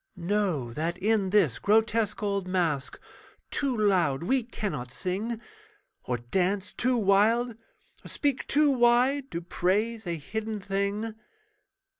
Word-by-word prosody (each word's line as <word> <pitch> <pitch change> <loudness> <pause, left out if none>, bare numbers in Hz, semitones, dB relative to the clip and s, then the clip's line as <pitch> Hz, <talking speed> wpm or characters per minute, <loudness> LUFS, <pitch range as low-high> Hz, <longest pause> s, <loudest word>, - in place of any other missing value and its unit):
Know 175 - -1
that 165 +6 -2
in 205 0 +1
this 185 - +3
grotesque 220 0 +2
old 200 -2 -1
masque 165 -7 -1 0.5
Too 270 -4 -1
loud 180 -9 +2
we 260 +8 +2
cannot 195 - -4
sing, 205 - -3 0.7
Or 125 - -1
dance 190 - -1
too 250 0 +1
wild, 220 +4 +3 0.5
or - - -10
speak 285 -3 -1
too 295 0 +4
wide 255 +2 +3
To 170 - -4
praise 205 +5 -1
a 170 - -1
hidden 215 +7 -4
thing. 200 +3 -2
205 Hz, 125 wpm, -27 LUFS, 180-230 Hz, 0.7 s, too